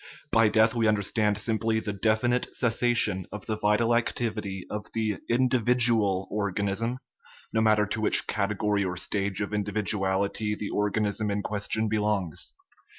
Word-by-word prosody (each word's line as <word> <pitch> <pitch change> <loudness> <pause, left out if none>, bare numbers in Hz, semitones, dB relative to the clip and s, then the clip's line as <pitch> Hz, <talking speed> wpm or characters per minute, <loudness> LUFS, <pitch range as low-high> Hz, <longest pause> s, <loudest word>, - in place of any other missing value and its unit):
By 115 -1 +5
death 110 +1 +4
we 115 -2 +1
understand 105 0 +1
simply 110 +1 +1
the 105 -2 -4
definitive 110 +5 0
cessation 115 -6 +1
of 105 -2 -7
the 110 - -2
vital 105 +2 +2
activity 105 -5 -2
of 105 0 -5
the 110 -3 -1
indi 125 +1 +2
vidual 115 -5 +2
organism, 100 +3 -1 0.6
no 110 - +2
matter 110 -1 +3
to 110 +2 -3
which 110 - +2
category 105 0 0
or 90 -1 -3
stage 100 +2 -2
of 100 +1 -3
individuality 105 0 -1
the 105 -1 -5
organism 105 +1 0
in 100 0 -2
question 110 +1 -1
belongs. 105 -6 -1
105 Hz, 145 wpm, -27 LUFS, 100-110 Hz, 0.6 s, By